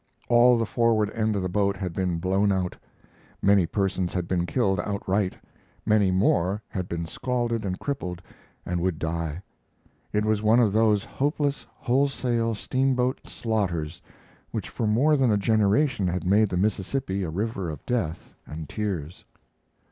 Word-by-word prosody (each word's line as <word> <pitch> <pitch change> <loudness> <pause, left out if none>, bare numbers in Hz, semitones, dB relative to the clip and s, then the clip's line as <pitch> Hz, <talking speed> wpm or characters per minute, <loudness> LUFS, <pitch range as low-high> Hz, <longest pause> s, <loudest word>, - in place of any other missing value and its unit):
All 120 +1 +6
the 115 - 0
forward 110 -2 +2
end 110 -1 0
of 100 - -1
the - - 0
boat 100 +1 0
had 90 -2 -4
been 90 -2 -1
blown 95 +4 +1
out. 95 -2 -1 0.6
Many 100 -3 +4
persons 95 -2 -1
had 90 -2 -1
been 90 -1 0
killed 95 -6 +1
outright; 100 0 -1 0.5
many 105 -2 +3
more 95 +1 +2
had 90 -2 -4
been 85 0 -3
scalded 120 +4 -2
and 95 -2 -2
crippled 90 -11 -4 0.5
and 90 -1 -2
would 90 -2 0
die. 80 +1 -3 0.7
It 105 0 +1
was 110 -1 +1
one 110 +3 +4
of 110 -5 +3
those 110 -2 +3
hopeless, 145 0 -1
wholesale 125 -3 0
steamboat 130 +2 0
slaughters 90 -7 -2 0.5
which - - -4
for 115 - -2
more 135 +9 +4
than 135 -4 +3
a 105 - +3
generation 110 +2 +2
had 90 -1 -2
made 105 +3 +4
the 90 - -2
Mississippi 100 +2 -1
a 90 - -2
river 100 +1 -2
of 75 -3 -8
death 105 -10 -2
and 80 0 -7
tears. 90 -7 -4
100 Hz, 155 wpm, -26 LUFS, 90-115 Hz, 0.7 s, All